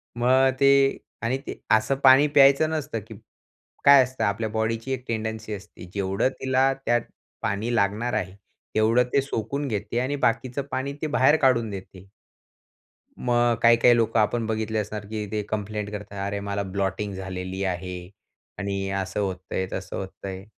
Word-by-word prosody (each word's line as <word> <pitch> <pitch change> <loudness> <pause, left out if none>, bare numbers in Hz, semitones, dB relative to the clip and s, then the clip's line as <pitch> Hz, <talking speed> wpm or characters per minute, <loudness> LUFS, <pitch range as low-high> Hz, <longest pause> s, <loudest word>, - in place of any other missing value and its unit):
मग 130 +2 +4
ते 140 0 +6 0.5
आणि 120 +3 0
ते - - -6
असं 110 +5 +3
पाणी 135 +2 +7
प्यायचं 140 +2 +6
नसतं, 150 -7 -3
की 110 - -10 0.7
काय 140 -2 +9
असतं, 130 +1 -4
आपल्या 105 +2 0
बॉडीची 115 +3 -2
एक 125 -1 -4
टेंडन्सी 110 -1 -3
असते. 100 -2 -10
जेवढं 100 +5 0
तिला 130 +1 +2
त्यात 120 0 +2 0.4
पाणी 110 +4 -1
लागणार 110 +3 0
आहे, 95 - -2 0.4
तेवढं 115 +3 +4
ते 140 - +4
सोकून 135 +2 -3
घेते 110 +1 -2
आणि 130 +3 -1
बाकीचं 125 +4 -2
पाणी 140 +2 -2
ते 155 - -1
बाहेर 135 +4 +5
काढून 115 -4 +3
देते. 95 -1 -9 1.1
मग 120 -1 +2
काही-काही 120 +1 +6
लोकं 115 -1 +1
आपण 115 +2 0
बघितले 110 0 -2
असणार, 105 0 -4
की 105 0 -4
ते 105 -1 -1
कंप्लेंट 105 0 -3
करतात, 105 -1 -7
"अरे, 100 0 -2
मला 100 0 -3
ब्लॉटिंग 100 +1 -2
झालेली 95 0 -5
आहे 90 -1 -4 0.5
आणि 100 -1 -2
असं 95 +1 -2
होतं 95 -2 -4
आहे, 95 - 0
तसं 95 -1 -5
होतं 95 +1 -7
आहे." 95 0 -7
110 Hz, 160 wpm, -25 LUFS, 100-125 Hz, 1.1 s, काय